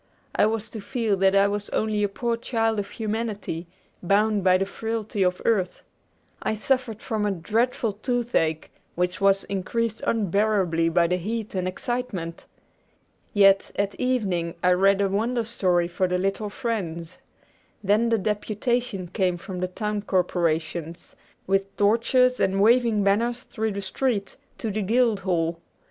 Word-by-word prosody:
I 210 - +4
was 220 0 -2
to 220 - -6
feel 225 -2 0
that 190 +1 +3
I 200 0 +5
was 205 0 -3
only 215 -1 0
a 205 - +1
poor 235 +3 -1
child 225 -2 0
of 200 0 -4
humanity, 210 -6 -4 0.3
bound 205 +2 +2
by 185 0 +5
the 195 - 0
frailty 220 0 -3
of 180 -1 +1
earth. 195 -6 0 0.6
I 220 - -1
suffered 235 -1 -1
from 220 -3 -2
a 205 - +1
dreadful 225 +5 0
toothache, 220 - -1 0.2
which 180 +2 -1
was 195 0 +4
increased 215 +3 -2
unbearably 200 -5 +2
by 170 +1 +3
the 180 +2 +1
heat 215 +4 -4
and 185 -1 -1
excitement. 190 -4 -4 0.8
Yet 195 -1 +5
at 200 0 0
evening 190 -10 0
I 180 - +5
read 195 +2 +4
a 200 - +3
Wonder 230 +5 0
Story 180 -6 +1
for 180 +2 0
the 180 0 0
little 195 +3 -1
friends. 185 -8 -4 0.6
Then 210 +4 +3
the 230 - +3
deputation 210 0 -1
came 180 -1 0
from 185 +1 -7
the 185 - -1
town 210 +2 -3
corporations, 170 -3 -1 0.3
with 195 0 0
torches 245 +4 +3
and 190 0 +1
waving 225 0 +4
banners 235 +5 +1
through 220 -4 -3
the 200 0 -4
street, 205 0 -1 0.2
to 220 - -3
the 215 +2 -2
guild 225 +1 +2
hall. 170 -3 -1
205 Hz, 155 wpm, -25 LUFS, 185-225 Hz, 0.8 s, I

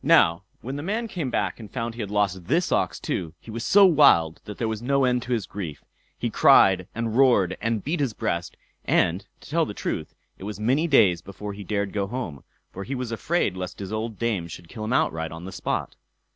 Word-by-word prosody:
Now, 85 +2 +5 0.2
when 135 +3 -5
the - - -4
man 215 +8 -2
came 170 - -3
back 120 - -1
and 110 -3 -9
found 115 -2 -3
he 120 - -6
had 105 - -4
lost 100 -3 0
this 170 +4 +1
ox - - +1
too, 80 -2 -3
he 115 - -11
was 115 +1 -4
so 200 +7 +6
wild 140 - +5
that 105 - -8
there 115 - -1
was 110 -1 -3
no 140 +2 +2
end 125 -1 +2
to 125 - -7
his 115 -6 0
grief. 85 -8 -7 0.3
He - - -2
cried 90 -2 +5
and 115 -1 -2
roared 120 -9 +4
and 115 -1 -1
beat 160 +4 -1
his 135 -6 0
breast, 85 -6 -3 0.3
and, - - +1
to - - -13
tell - - +3
the - - -6
truth, - - -4 0.2
it - - -10
was 105 +1 -6
many 130 +10 +2
days 95 - +4
before 100 +3 -7
he 100 +1 -8
dared 100 0 -2
go 100 -1 -1
home; 100 - -5 0.3
for 100 - -6
he 135 +6 -4
was 125 -2 -4
afraid 115 - 0
lest 90 -1 -5
his 100 +1 -6
old 110 0 -3
dame 110 -8 -1
should 85 +1 -10
kill 110 -1 -6
him 110 - -1
outright 80 -8 0
on 80 +2 -8
the 95 - -7
spot. - - -3
110 Hz, 230 wpm, -25 LUFS, 95-125 Hz, 0.3 s, so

